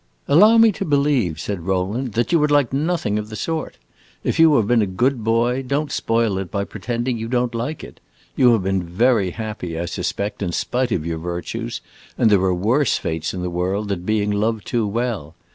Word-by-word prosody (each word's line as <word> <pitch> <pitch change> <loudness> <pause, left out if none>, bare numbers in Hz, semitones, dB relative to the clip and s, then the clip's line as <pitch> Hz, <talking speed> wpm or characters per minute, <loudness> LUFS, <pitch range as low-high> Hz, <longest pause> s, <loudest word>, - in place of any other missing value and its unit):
"Allow 210 +10 +6
me 225 -1 +6
to - - -4
believe," 140 - +1
said 100 -3 -3
Rowland, 100 +6 -1
"that 120 +7 0
you 170 - +4
would 150 0 +2
like 145 -4 +2
nothing 145 -8 0
of 105 0 -6
the 110 - -7
sort. 160 - -3 0.5
If - - -1
you 160 -2 +6
have 115 - +3
been 120 +1 +3
a 105 - +1
good 120 +6 0
boy, 120 +3 +1
don't 140 +3 -2
spoil 115 -4 0
it 95 -2 -5
by 100 - -2
pretending 120 +4 -3
you 115 - -4
don't 125 0 0
like 125 +7 -4
it. - - -11 0.4
You 125 -2 +5
have 110 -5 +1
been 95 0 0
very 100 +4 +1
happy, 90 -4 -5
I 85 - -2
suspect, 100 +5 -3
in 90 -3 -2
spite 125 +5 -1
of 80 -6 -1
your 85 -1 -3
virtues, 85 +1 -5 0.4
and 115 -3 +3
there 100 -3 +4
are 95 -1 +2
worse 115 +9 +2
fates 80 0 -3
in 90 - -4
the 90 - -3
world 95 +4 -2
than 95 -3 -2
being 105 +2 0
loved 110 +1 -1
too 115 -3 0
well. 105 -8 -3
110 Hz, 210 wpm, -21 LUFS, 95-125 Hz, 0.5 s, Allow